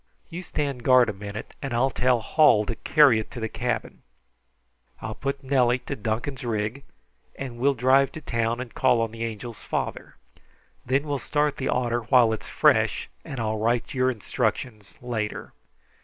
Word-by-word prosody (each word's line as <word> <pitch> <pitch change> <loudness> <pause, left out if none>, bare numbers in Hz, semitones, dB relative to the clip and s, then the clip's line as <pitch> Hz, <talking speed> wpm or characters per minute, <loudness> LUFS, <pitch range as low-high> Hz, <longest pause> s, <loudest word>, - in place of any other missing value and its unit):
You 170 +2 -5
stand 145 -7 -3
guard 125 -2 +5
a - - -2
minute 100 +2 -8
and 135 -4 -3
I'll 130 +3 +2
tell 125 -2 +2
Hall 110 -6 +4
to 115 - -2
carry 140 -6 +5
it 110 - -6
to 125 - -8
the 110 - -2
cabin. - - -3 1.0
I'll 110 0 -5
put 140 +3 -4
Nellie 130 -2 +3
to - - -3
Duncan's 115 +5 -3
rig, 110 +3 -2 0.5
and 125 -3 -6
we'll 140 +2 +2
drive 130 +2 +4
to 155 - -8
town 115 -2 -1
and 125 -2 -7
call 120 - +3
on 115 -1 -1
the 115 0 -6
Angel's 115 0 -6
father. - - -4 0.7
Then 135 +3 +1
we'll 145 -2 -2
start 145 +3 0
the 135 - -2
otter 120 -1 0
while 120 -1 +4
it 110 - -4
is - - -13
fresh, - - +2
and 135 - -7
I'll 110 -1 -1
write 115 +2 0
your 130 -1 +2
instructions 110 -2 -3
later. 110 -4 -4
120 Hz, 175 wpm, -25 LUFS, 110-135 Hz, 1.0 s, guard